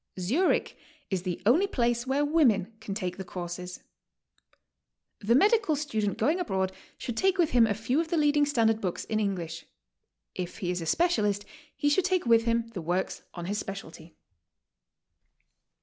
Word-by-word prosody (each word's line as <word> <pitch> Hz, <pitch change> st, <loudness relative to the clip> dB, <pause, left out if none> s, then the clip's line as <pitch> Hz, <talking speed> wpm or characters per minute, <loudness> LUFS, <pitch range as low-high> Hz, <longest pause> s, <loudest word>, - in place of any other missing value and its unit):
Zurich 265 Hz, -, +1 dB, 0.4 s
is 190 Hz, -2 st, 0 dB
the 180 Hz, -2 st, -3 dB
only 315 Hz, -, +4 dB
place 240 Hz, -, 0 dB
where 280 Hz, +2 st, +1 dB
women 235 Hz, -, +2 dB
can 210 Hz, -3 st, -5 dB
take 180 Hz, -4 st, -3 dB
the 190 Hz, -, -5 dB
courses. 180 Hz, 0 st, -7 dB, 1.4 s
The 225 Hz, +3 st, +2 dB
medical 405 Hz, -, +4 dB
student 220 Hz, -9 st, -2 dB
going 325 Hz, +5 st, +1 dB
abroad 190 Hz, -, -1 dB, 0.3 s
should 240 Hz, -, -5 dB
take 385 Hz, +7 st, +2 dB
with 340 Hz, -3 st, +2 dB
him 235 Hz, -2 st, +5 dB
a 205 Hz, -, 0 dB
few 245 Hz, +8 st, 0 dB
of 335 Hz, -, -4 dB
the 335 Hz, 0 st, -1 dB
leading 295 Hz, -1 st, +3 dB
standard 225 Hz, -5 st, +2 dB
books 180 Hz, -3 st, -2 dB
in 215 Hz, -, -1 dB
English; 170 Hz, -6 st, -3 dB, 0.7 s
if 180 Hz, -1 st, -5 dB
he 180 Hz, -5 st, -2 dB
is 180 Hz, -1 st, -3 dB
a 165 Hz, -, -5 dB
specialist, 210 Hz, -, +1 dB, 0.3 s
he 290 Hz, -, -1 dB
should 315 Hz, +5 st, +3 dB
take 370 Hz, -4 st, +1 dB
with 230 Hz, -1 st, +4 dB
him 230 Hz, 0 st, 0 dB
the 205 Hz, -6 st, -6 dB
works 175 Hz, +3 st, -2 dB
on 175 Hz, -1 st, -5 dB
his 205 Hz, +3 st, -2 dB
specialty. 165 Hz, -5 st, -8 dB
225 Hz, 165 wpm, -28 LUFS, 185-290 Hz, 1.4 s, him